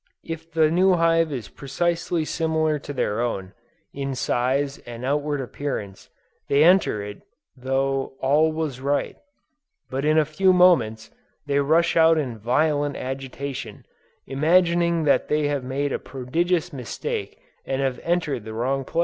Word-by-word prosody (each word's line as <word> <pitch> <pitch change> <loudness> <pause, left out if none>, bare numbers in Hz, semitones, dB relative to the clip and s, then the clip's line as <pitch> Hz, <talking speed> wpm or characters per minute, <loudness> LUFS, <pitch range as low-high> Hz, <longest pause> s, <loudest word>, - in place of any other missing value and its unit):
If 165 0 -7
the 160 -1 +3
new 185 +3 +4
hive 165 -1 +2
is 125 -6 -5
precisely 170 +3 -2
similar 160 -2 0
to 145 - -8
their 115 -5 -1
own, 95 -5 -3 0.4
in 135 -1 -3
size 135 +3 0
and 120 +1 -8
outward 145 +1 0
appearance, 125 -7 -5 0.4
they 140 +2 +4
enter 175 - +4
it 100 0 -7
as - - -25 0.3
though 135 +1 -1
all 150 +4 +3
was 155 -5 -3
right; 140 +1 -1 0.8
but 135 +1 -2
in 155 +1 +3
a 155 - +4
few 185 +5 +3
moments, 165 -12 +3 0.3
they 140 -1 +1
rush 160 +4 +2
out 165 0 +5
in 125 -7 -3
violent 145 +5 +1
agitation, 135 +1 -6 0.4
imagining 170 +3 +2
that 145 - +2
they 150 0 +1
have 140 -3 -1
made 135 +2 -2
a - - -1
prodigious 165 +7 -1
mistake 125 -4 -5 0.3
and 135 - -2
have 130 -2 -1
entered 165 -8 -1
the 110 0 -8
wrong 135 +4 -1
place. 165 - -3
145 Hz, 150 wpm, -23 LUFS, 130-165 Hz, 0.8 s, out